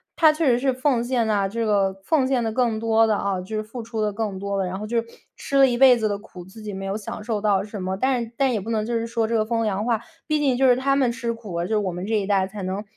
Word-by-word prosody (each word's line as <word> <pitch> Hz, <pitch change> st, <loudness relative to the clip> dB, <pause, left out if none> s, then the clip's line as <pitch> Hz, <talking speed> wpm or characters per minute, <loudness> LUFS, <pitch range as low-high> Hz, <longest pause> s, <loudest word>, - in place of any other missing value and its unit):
他 315 Hz, -2 st, +6 dB
确 315 Hz, +1 st, -1 dB
实 240 Hz, -2 st, +4 dB
是 265 Hz, +2 st, +1 dB
奉 255 Hz, -1 st, +1 dB
献 240 Hz, -2 st, 0 dB
啊， 200 Hz, -2 st, +2 dB
这 230 Hz, +2 st, -2 dB
个 200 Hz, -3 st, +2 dB
奉 300 Hz, -5 st, +2 dB
献 260 Hz, -2 st, +1 dB
得 225 Hz, -, -1 dB
更 235 Hz, -2 st, +1 dB
多 225 Hz, 0 st, +3 dB
的， 215 Hz, -, +2 dB
啊， 195 Hz, -2 st, -1 dB
就 215 Hz, +4 st, -5 dB
是 215 Hz, -, -2 dB
付 225 Hz, +2 st, -8 dB
出 225 Hz, -1 st, -4 dB
得 210 Hz, -1 st, 0 dB
更 205 Hz, -3 st, -3 dB
多 200 Hz, 0 st, -3 dB
的， 195 Hz, -, 0 dB
然 185 Hz, +1 st, -4 dB
后 215 Hz, -, -5 dB
就 235 Hz, +1 st, +1 dB
是 230 Hz, -, -13 dB, 0.3 s
吃 275 Hz, -, -2 dB
了 270 Hz, -1 st, +7 dB
一 240 Hz, -, 0 dB
辈 260 Hz, -1 st, +7 dB
子 220 Hz, -2 st, 0 dB
的 205 Hz, -1 st, -1 dB
苦， 185 Hz, -4 st, -12 dB
自 205 Hz, +4 st, -13 dB
己 210 Hz, -, -6 dB
没 195 Hz, 0 st, -5 dB
有 195 Hz, +1 st, -2 dB
享 210 Hz, 0 st, -6 dB
受 210 Hz, -1 st, -2 dB
到 200 Hz, -2 st, +2 dB
什 205 Hz, -1 st, -7 dB
么。 190 Hz, +1 st, -2 dB
但 255 Hz, +2 st, +1 dB
是 230 Hz, -, -10 dB
但 270 Hz, -2 st, +2 dB
也 215 Hz, -, -1 dB
不 220 Hz, -, -7 dB
能 215 Hz, -2 st, 0 dB
就 235 Hz, -, -3 dB
是 230 Hz, 0 st, -1 dB
说 230 Hz, -1 st, -1 dB
这 230 Hz, -, -1 dB
个 215 Hz, -, +1 dB
风 230 Hz, 0 st, 0 dB
凉 205 Hz, -1 st, -1 dB
话， 230 Hz, -3 st, +1 dB, 0.3 s
毕 305 Hz, -1 st, +1 dB
竟 275 Hz, -4 st, +2 dB
就 265 Hz, -, +2 dB
是 245 Hz, -, +5 dB
他 275 Hz, +1 st, +1 dB
们 260 Hz, -4 st, +2 dB
吃 235 Hz, 0 st, -3 dB
苦， 210 Hz, -7 st, -6 dB
就 175 Hz, -, -3 dB
是 220 Hz, -, 0 dB
我 200 Hz, -3 st, -1 dB
们 180 Hz, +2 st, -5 dB
这 220 Hz, -, 0 dB
一 -, -, -3 dB
代 195 Hz, -2 st, +2 dB
才 200 Hz, +1 st, -8 dB
能 190 Hz, +2 st, -3 dB
220 Hz, 345 characters per minute, -23 LUFS, 200-245 Hz, 0.3 s, 了